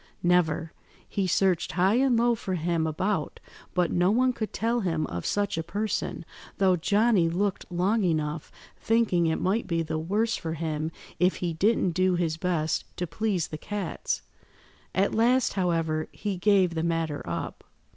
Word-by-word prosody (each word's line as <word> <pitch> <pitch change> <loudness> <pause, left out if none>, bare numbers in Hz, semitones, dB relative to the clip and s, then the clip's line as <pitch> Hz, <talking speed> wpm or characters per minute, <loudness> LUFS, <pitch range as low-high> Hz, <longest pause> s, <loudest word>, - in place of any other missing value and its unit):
"Never. 170 -2 +2 0.3
He 195 -2 -1
searched 180 -1 +1
high 190 +3 +3
and 255 0 +3
low 240 +1 +3
for 190 -4 -3
him 165 -1 0
about, 180 +1 -2 0.4
but 180 -2 +2
no 175 +1 +3
one 250 +4 +3
could 220 -3 -4
tell 230 +2 0
him 165 -7 0
of 85 - -4
such 205 -4 0
a - - -2
person, 205 +5 -3 0.3
though 190 -2 +4
Johnny 200 0 +3
looked 190 +2 -2
long 195 +5 +1
enough, 155 -3 -1 0.3
thinking 220 -7 +2
it 160 - 0
might 200 +5 0
be 165 -2 0
the 160 0 -3
worse 210 +8 0
for 160 -2 -4
him 155 0 -2 0.3
if 180 +1 +3
he 175 -2 -2
didn't 190 +2 +2
do 185 +1 +2
his 165 -2 -1
best 160 -3 -1
to 180 - -1
please 185 +1 -1
the 155 - -6
cats. 205 +3 -3 0.7
At 195 +1 +2
last, 245 +3 +3
however, 165 -4 0
he 205 -2 -3
gave 185 -2 +3
the 160 - -1
matter 165 -3 -1
up." - - -4
180 Hz, 165 wpm, -27 LUFS, 165-205 Hz, 0.7 s, though